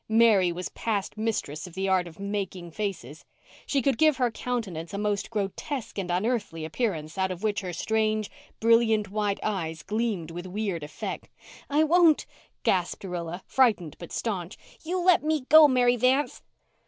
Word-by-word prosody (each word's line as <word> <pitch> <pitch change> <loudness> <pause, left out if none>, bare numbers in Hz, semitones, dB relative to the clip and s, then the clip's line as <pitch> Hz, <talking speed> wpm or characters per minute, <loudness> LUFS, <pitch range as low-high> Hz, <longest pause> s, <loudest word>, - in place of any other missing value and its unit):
Mary 220 -5 +5
was 180 +1 -5
past 210 -4 -2
mistress 215 -8 -3
in 175 - -13
the 190 +2 -2
art 185 -2 +2
of 165 +1 -13
"making 195 -3 -4
faces." 160 - -5 0.4
She 275 -3 +1
could 265 -3 +1
give 310 -3 +5
her 250 -3 +1
countenance 200 -9 -4
a - - -2
most 205 -1 -1
grotesque 215 +4 -4
and 185 -2 -4
unearthly 180 -4 -1
appearance 160 -3 -3
out 190 0 +1
of 185 +2 -6
which 215 0 0
her 185 -2 -4
strange, 215 +3 0 0.3
brilliant, 225 -2 +3
white 205 -1 -1
eyes 165 -7 -3
gleamed 210 -6 -2
with 175 +2 -6
weird 195 -3 -3
effect. 150 0 -6 0.4
"I 295 +2 +3
won't," 325 -1 +4 0.4
gasped 180 0 0
Rilla, 175 -1 -5
frightened 210 - +2
but 170 - -9
staunch. 195 -4 -3 0.3
"You 355 +3 -1
let 365 -2 +6
me 310 -1 +1
go, 315 -1 +9
Mary 245 -2 +3
Vanth." 260 +4 +1
205 Hz, 165 wpm, -27 LUFS, 180-235 Hz, 0.4 s, go